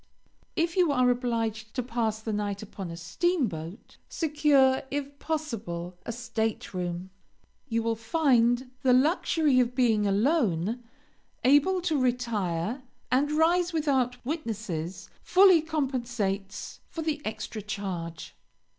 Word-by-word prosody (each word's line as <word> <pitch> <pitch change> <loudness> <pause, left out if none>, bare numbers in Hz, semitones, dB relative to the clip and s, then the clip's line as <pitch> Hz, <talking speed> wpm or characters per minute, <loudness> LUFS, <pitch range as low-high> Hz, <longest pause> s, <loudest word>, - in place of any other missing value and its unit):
If 335 +1 0
you 355 -5 +4
are 255 -2 +4
obliged 225 -3 -2
to 250 - -1
pass 225 -2 -1
the 220 0 -3
night 205 -1 -2
upon 195 -3 -7
a 165 - -7
steamboat 195 - -2
secure, 290 -4 +3
if 280 0 -4
possible, 220 - -4
a - - -1
stateroom. 190 -6 -3 0.6
You 230 -1 0
will 230 0 0
find 245 -1 +2
the 260 -2 +4
luxury 295 0 +3
of 250 0 +1
being 225 -5 +3
alone, 220 - +1 0.6
able 290 +8 +4
to 320 -6 0
retire 235 -4 -1 0.3
and 280 +4 +2
rise 340 +3 +3
without 265 -6 +1
witnesses, 215 - -4
fully 370 -2 +6
compensates 240 - -3
for 325 - -5
the 305 -2 -1
extra 215 0 -5
charge. 190 -5 -5
240 Hz, 120 wpm, -28 LUFS, 210-290 Hz, 0.6 s, fully